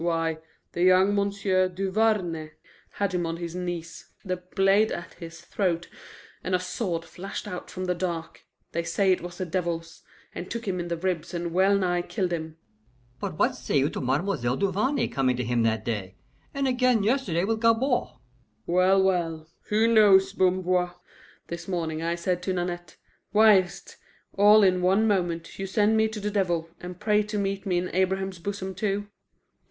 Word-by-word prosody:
Why, 165 -2 0 0.3
the 175 - -4
young 185 +2 +5
M'sieu' 200 -2 +1
Duvarney 185 -4 0 0.4
had 200 -2 -1
him 175 -2 0
on 165 0 -3
his 170 -1 -5
knees, 175 -2 -5 0.2
the 185 -1 -2
blade 195 +4 +2
at 170 -1 -6
his 170 0 -10
throat, 175 -4 -2 0.5
and 185 - 0
a - - +1
sword 180 -2 -3
flashed 195 +3 -7
out 180 -3 -6
from 185 0 -5
the 180 - +1
dark 170 -2 -4 0.3
they 170 - -1
say 190 +3 +1
it 185 - +1
was 175 0 -8
the 185 - -3
devil's 170 -2 -3 0.3
and 180 - -7
took 235 -2 -5
him 185 -2 -1
in 175 - -3
the 170 -1 -2
ribs 175 -1 -2
and 170 -1 -3
well 195 +2 +4
nigh 175 -2 +1
killed 180 -1 -2
him." 160 -1 -5 0.6
"But 185 -3 -4
what - - +2
say - - -1
you 140 +2 +2
to - - -4
Ma'm'selle 135 -1 0
Duvarney 205 +9 +1
coming 130 -3 0
to 125 - -1
him 120 0 0
that 110 -1 0
day, 100 -5 -3 0.4
and 275 -1 -1
again 250 -4 +2
yesterday 215 -7 +1
with 220 +2 -1
Gabord?" 235 +3 +2 0.6
"Well, 185 +2 +4
well, 165 -4 -1 0.2
who 220 +2 +3
knows, 205 -4 +5
Bamboir? 180 -1 +1 0.5
This 170 0 -7
morning 165 -4 -2
I 170 +1 -1
said 175 +1 -1
to 185 +1 -2
Nanette, 175 -2 -4 0.4
'Why 215 -1 +7
is't, 180 0 -7 0.4
all 210 +1 +6
in 185 -1 +3
one 195 +5 +3
moment, 175 -5 -1
you 195 - -3
send 210 +3 +2
me 220 0 +3
to 220 -1 -6
the 210 0 -2
devil, 175 -5 0
and 180 0 -8
pray 210 0 +3
to 210 0 -4
meet 195 0 -2
me 180 -2 +1
in 180 +1 -2
Abraham's 190 0 0
bosom 190 +1 -4
too? 205 +1 -2
185 Hz, 180 wpm, -26 LUFS, 170-200 Hz, 0.6 s, Why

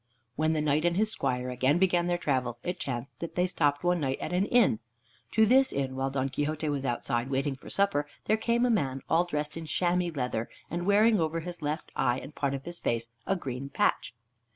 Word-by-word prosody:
When 155 +1 +1
the 155 - 0
Knight 150 +1 +2
and 175 0 +2
his 215 +1 +2
squire 125 - -1
again 130 +5 +2
began 175 -1 +2
their 175 0 +1
travels, 130 -7 -1
it 180 +1 -3
chanced 130 -6 -5
that 170 - -6
they 180 - +3
stopped 145 -5 +1
one 175 0 +2
night 135 -3 -1
at - - -4
an 185 +3 +2
inn. 235 - +4 0.5
To 220 - +5
this 265 +4 +5
inn, 135 -1 -2
while 135 +1 -1
Don 135 0 -1
Quixote 155 +3 -2
was 140 -2 -1
outside, 120 +1 -1
waiting 135 +1 0
for 130 - -12
supper, 195 -8 +1 0.2
there 215 - +3
came 235 +2 +1
a 245 - +3
man, 135 - 0
all 170 +2 +3
dressed 150 -2 -3
in 165 -1 -6
chamois 175 +1 +1
leather, 125 -4 -2 0.2
and 175 +2 -2
wearing 210 +1 +5
over 165 0 0
his 175 0 -7
left 150 +2 -3
eye, 120 +1 +2
and 140 +3 -8
part 140 -1 -1
of 135 - -7
his 175 0 -5
face, 115 0 -1 0.2
a 195 - +2
green 135 -5 -5
patch. 130 - 0
155 Hz, 225 wpm, -29 LUFS, 135-180 Hz, 0.5 s, To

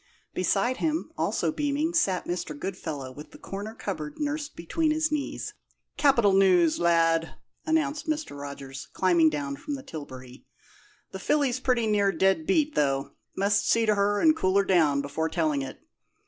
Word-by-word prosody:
Beside 255 +1 +1
him, 320 0 -1
also - - 0
beaming, 300 +2 -1
sat 190 - +1
Mr. 175 -4 -4
Goodfellow, 155 -6 -5
with 150 +3 -11
the - - -14
corner 205 +3 -7
cupboard 155 -9 -5
nursed 295 0 -3
between 310 - -1
his 310 0 +1
knees. 295 -2 -3 0.4
"Capital 235 -9 +4
news, 180 -4 +4
lad!" 165 -1 +2 0.3
announced 310 -1 0
Mr. 310 - -2
Rogers, 140 -2 -8
climbing 170 -4 +4
down 140 -2 -4
from 290 - -5
the 270 - -9
tilbury. 130 - -9 0.7
"The - - -6
filly's 275 -4 +1
pretty 250 -3 +1
near 205 -2 +2
dead 190 -5 +1
beat, 300 +9 +2
though 140 -1 0 0.3
must 200 +1 +2
see 230 0 +3
to 215 - +3
her 205 0 +1
and 315 -1 +5
cool 185 -9 +1
her 200 - +3
down 155 -7 +3
before 160 +3 -2
telling 155 -4 0
it. 135 - -7
195 Hz, 160 wpm, -27 LUFS, -, 0.7 s, and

